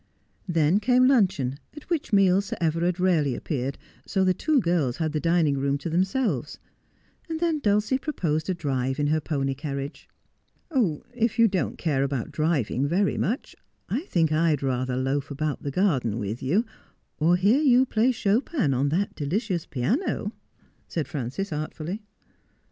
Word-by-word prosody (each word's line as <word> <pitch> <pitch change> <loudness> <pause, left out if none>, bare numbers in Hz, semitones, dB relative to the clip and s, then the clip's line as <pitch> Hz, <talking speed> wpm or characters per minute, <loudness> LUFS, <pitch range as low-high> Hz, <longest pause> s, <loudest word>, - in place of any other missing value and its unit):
Then 165 +2 +3
came 250 +3 +4
luncheon, 190 - +2 0.2
at 300 - -11
which 325 -8 -1
meal 195 -2 +5
Sir 200 - -6
Everard 170 +2 0
rarely 160 -8 +2
appeared, 135 -3 -3 0.3
so 190 -2 +1
the 185 0 +3
two 305 +7 +2
girls 170 - 0
had 160 -2 -1
the 155 - -1
dining 165 -4 +2
room 140 +1 +1
to 150 +4 -5
themselves, 185 - 0 0.7
and 320 -1 -3
then 330 -2 +1
Dulcie 210 +2 +1
proposed 165 - -2
a 185 - +1
drive 135 -4 -2
in 145 - +1
her 155 +2 +1
pony 135 -3 -1
carriage. 140 +1 -6 0.6
'If 230 - 0
you 230 -1 +6
don't 190 -4 -1
care 145 -5 0
about 135 -4 -2
driving 145 -4 0
very 190 +6 +1
much, 245 - -2 0.3
I 240 +7 0
think 165 - +1
I'd 155 -2 +2
rather 130 -1 -1
loaf 135 +2 -1
about 150 +1 -3
the 145 - -3
garden 135 - +1
with 110 +1 -4
you, 185 - +1 0.5
or 165 +3 +4
hear 205 +10 +3
you 260 -3 +5
play 235 +1 +2
Chopin 225 - +1
on 135 +3 +1
that 190 +7 0
delicious 175 - -2
piano,' 210 - -1 0.6
said 160 -4 -3
Frances 145 +8 -4
artfully. 155 +6 -4
165 Hz, 160 wpm, -25 LUFS, 140-205 Hz, 0.7 s, you